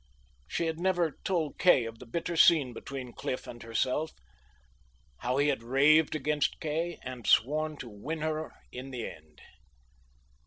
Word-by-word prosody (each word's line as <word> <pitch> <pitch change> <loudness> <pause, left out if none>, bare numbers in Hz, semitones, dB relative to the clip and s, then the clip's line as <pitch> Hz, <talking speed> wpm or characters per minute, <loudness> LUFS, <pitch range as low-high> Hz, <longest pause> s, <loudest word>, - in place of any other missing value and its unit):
She 170 - -1
had 160 0 -2
never 175 -4 +1
told 165 -6 -1
Kay 155 -10 +5
of 115 0 -8
the 125 - -11
bitter 170 +7 -3
scene 150 -6 +5
between 130 0 -7
Cliff 130 - -4
and 120 -1 -9
herself, 125 +7 -1 1.1
how 125 +2 -1
he 145 +1 +3
had 135 -5 0
raved 145 +6 +4
against 150 0 0
Kay 160 +3 -2
and 125 -2 -7
sworn 155 +5 +3
to 125 - -7
win 135 +9 -5
her 155 0 -2 0.2
in 130 +2 -7
the 125 -3 -4
end. 75 -2 -13
145 Hz, 155 wpm, -30 LUFS, 125-160 Hz, 1.1 s, Kay